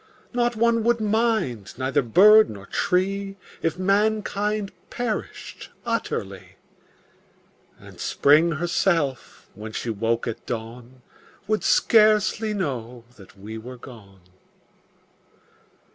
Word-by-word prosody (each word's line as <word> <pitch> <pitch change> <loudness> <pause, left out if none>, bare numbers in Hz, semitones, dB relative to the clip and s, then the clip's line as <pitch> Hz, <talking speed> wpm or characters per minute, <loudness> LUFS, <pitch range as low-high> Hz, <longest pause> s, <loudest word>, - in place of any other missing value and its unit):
Not 240 -1 0
one 230 0 +2
would 235 0 +2
mind, 215 - -1
neither 130 0 0
bird 210 - +6
nor 100 -2 -9
tree 195 - -1 0.2
If 165 +1 -1
mankind 210 +1 0 0.2
perished 240 -3 -5 0.2
utterly; 105 - -4 1.2
And - - -15
Spring 155 +4 +3
herself, 165 -4 -1
when 110 +1 -9
she 115 - -3
woke 115 +2 -1
at 115 - -5
dawn, 120 +2 -7 0.4
Would 215 +1 -1
scarcely 215 0 +3
know 125 - -4
that 100 0 -17
we 110 +3 -8
were 125 +3 -10
gone. 105 -6 -14
175 Hz, 100 wpm, -23 LUFS, -, 1.2 s, bird